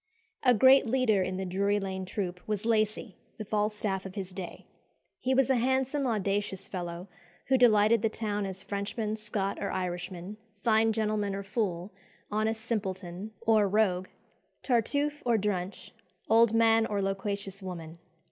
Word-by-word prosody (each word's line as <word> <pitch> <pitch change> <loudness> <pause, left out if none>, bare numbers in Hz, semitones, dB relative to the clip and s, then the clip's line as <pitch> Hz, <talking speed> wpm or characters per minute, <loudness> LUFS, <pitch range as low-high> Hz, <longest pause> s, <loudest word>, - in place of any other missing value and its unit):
A 250 -2 +5
great 260 +3 +6
leader 225 -5 +2
in 185 0 -2
the 190 - -3
Drury 200 +3 +1
Lane 190 -1 -4
troop 185 -2 -4
was 210 -1 -2
Lacy, 215 -2 0 0.2
the 215 - -6
Falstaff 210 -2 -1
of 190 0 -9
his 195 -2 -5
day. 185 -2 -7 0.5
He 260 +1 +1
was 270 -1 +4
a 260 - +3
handsome, 265 +3 +1
audacious 200 -3 -1
fellow, 175 -1 -5 0.4
who 265 - +5
delighted 220 -2 +5
the 225 - +2
town 210 -2 -2
as 190 0 -6
"Frenchman, 210 +2 -3
Scot, 210 -2 -3
or 200 - -1
Irishman, 180 +1 -4 0.3
fine 225 -1 +4
gentleman 210 -2 -1
or 200 - -4
fool, 195 -3 -2 0.4
honest 220 +1 0
simpleton 190 -3 -3
or 220 -3 +4
rogue, 190 -3 +2 0.6
Tartuffe 285 +5 +1
or 235 -2 +3
Drench, 195 -2 -3 0.4
old 225 0 +5
man 225 0 +4
or 205 - -1
loquacious 195 0 -3
woman." 170 -3 -7
210 Hz, 150 wpm, -29 LUFS, 190-225 Hz, 0.6 s, great